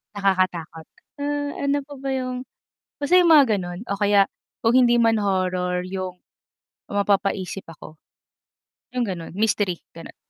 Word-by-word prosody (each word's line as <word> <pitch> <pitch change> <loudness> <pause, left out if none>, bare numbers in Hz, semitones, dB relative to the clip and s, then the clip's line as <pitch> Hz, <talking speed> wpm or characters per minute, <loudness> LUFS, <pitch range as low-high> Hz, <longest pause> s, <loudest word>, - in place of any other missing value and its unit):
Nakakatakot. 185 -5 0 0.3
Uh, 290 0 -2
ano 280 +1 +1
pa 290 - -9
ba 275 0 -4
yung 255 -1 -3 0.6
basta 290 +5 +2
yung 355 -2 +6
mga 270 -9 +6
gano'n, 175 -1 -5
o 200 - -1
kaya, 205 -1 +4 0.4
kung 230 +1 +3
hindi 240 -2 +5
man 225 -2 +3
horror, 180 -2 0
yung 185 -1 -5 0.7
mapapaisip 200 -1 0
ako, 155 -1 -12 1.0
yung 245 -1 +1
gano'n, 170 -3 -5
mystery 205 -4 +1 0.2
gano'n. 165 - -11
200 Hz, 135 wpm, -23 LUFS, 185-250 Hz, 1.0 s, yung